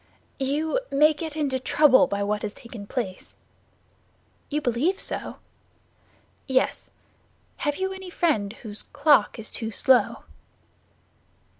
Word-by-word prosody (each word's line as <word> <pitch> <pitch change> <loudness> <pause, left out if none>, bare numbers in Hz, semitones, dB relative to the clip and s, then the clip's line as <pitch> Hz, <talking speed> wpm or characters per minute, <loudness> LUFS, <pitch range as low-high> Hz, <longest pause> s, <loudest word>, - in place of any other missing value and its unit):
"You 295 - 0
may 300 +3 +4
get 310 0 -6
into 275 -4 0
trouble 275 0 +5
by 200 0 -2
what 210 +1 -1
has 210 -1 -5
taken 230 -4 -10
place." 200 -7 -5 1.1
"You 300 - 0
believe 295 +8 0
so?" - - -2 1.1
"Yes. 260 -1 0 0.7
Have 290 -2 -1
you 380 +2 -2
any 380 -1 -8
friend 295 - 0
whose 215 -2 -6
clock 290 -6 +3
is 220 -1 -5
too 225 -2 -3
slow?" 250 +3 +3
270 Hz, 120 wpm, -25 LUFS, 220-305 Hz, 1.1 s, trouble